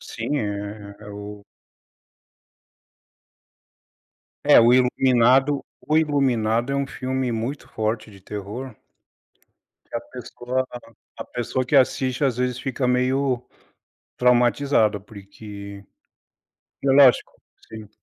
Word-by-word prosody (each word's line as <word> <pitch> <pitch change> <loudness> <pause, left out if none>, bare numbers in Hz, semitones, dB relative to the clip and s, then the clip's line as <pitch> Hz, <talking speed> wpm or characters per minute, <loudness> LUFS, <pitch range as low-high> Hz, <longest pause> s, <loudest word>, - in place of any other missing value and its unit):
Sim, 120 +6 -4
é 105 0 -6
o 105 0 -9 3.0
É - - +7
o 120 +1 +5
Iluminado 130 +2 +3 0.2
o 155 - +2
Iluminado 130 -6 +1
é - - 0
um 140 0 -1
filme 130 -1 -3
muito 115 +6 -4
forte 110 0 -3
de 100 -2 -15
terror 105 +5 -7 1.1
que - - -3
a - - -3
pessoa 125 +1 -4 0.5
a - - -6
pessoa 125 +2 -3
que 135 +3 +1
assiste 130 0 +2
às 130 -4 +1
vezes 125 0 -1
fica 130 0 -2
meio 125 0 +1 0.8
traumatizada, 125 -3 +3
porque 100 0 -11 1.0
e 140 - 0
é - - +5
lógico 135 -2 +5 0.4
sim. 110 -2 -10
125 Hz, 105 wpm, -23 LUFS, 110-130 Hz, 3.0 s, É